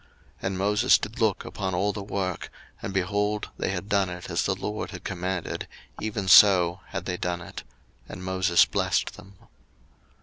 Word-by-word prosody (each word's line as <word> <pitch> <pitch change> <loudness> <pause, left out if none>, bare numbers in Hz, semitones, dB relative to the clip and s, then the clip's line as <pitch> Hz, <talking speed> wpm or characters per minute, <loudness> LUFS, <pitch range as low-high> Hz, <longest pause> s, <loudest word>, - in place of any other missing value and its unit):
02:039:043 - - -30 0.4
And 95 0 -2
Moses 105 +6 +4
did 105 +2 -6
look 110 -4 +1
upon 95 -3 -3
all 100 +3 +1
the 100 - -5
work, 95 -2 -3 0.3
and, 100 - -4
behold, 105 +3 -1
they - - -1
had 95 +1 -3
done 100 -3 +2
it 90 +1 -7
as 85 - +1
the 95 - +1
LORD 105 +3 -4
had 90 - -9
commanded, 90 -1 -3 0.3
even 105 -2 -3
so 90 -2 +7
had 95 -2 -5
they 90 0 -2
done 90 -1 -2
it: - - -8 0.5
and 95 - -8
Moses 95 -2 +4
blessed - - 0
them. 100 +1 -14
95 Hz, 175 wpm, -26 LUFS, 90-100 Hz, 0.5 s, so